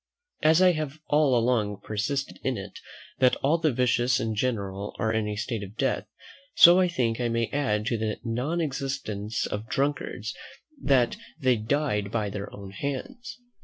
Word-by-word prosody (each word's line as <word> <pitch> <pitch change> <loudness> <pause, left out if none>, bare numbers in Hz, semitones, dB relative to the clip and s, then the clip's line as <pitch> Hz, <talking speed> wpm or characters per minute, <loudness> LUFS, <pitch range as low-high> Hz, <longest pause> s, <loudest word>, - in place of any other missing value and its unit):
As 160 +4 +5
I 180 - +7
have 155 -3 -3
all 145 -4 +4
along 110 -4 +1
persisted 135 +6 -2
in 130 -3 0
it, 100 0 -8 0.4
that 130 -1 +5
all 155 +5 +3
the 160 -2 +2
vicious 125 0 +2
in 110 -3 -1
general 100 -4 -2
are 110 0 0
in 110 -1 0
a 105 - -3
state 110 +1 -3
of 100 +2 -9
death; 135 -2 0 0.5
so 175 +2 +9
I 185 - +4
think 125 -9 -1
I 120 -1 0
may 115 0 -1
add 105 -7 0
to 115 -1 0
the 110 -1 -2
non 125 +9 -1
existence 130 -8 -3
of 105 +3 -5
drunkards, 135 -5 -2 0.5
that 130 -4 +3 0.2
they 130 -4 +3
died 110 -3 -1
by 105 -2 -1
their 100 0 -5
own 100 -1 -9
hands. 240 - -5
120 Hz, 170 wpm, -27 LUFS, 105-140 Hz, 0.5 s, so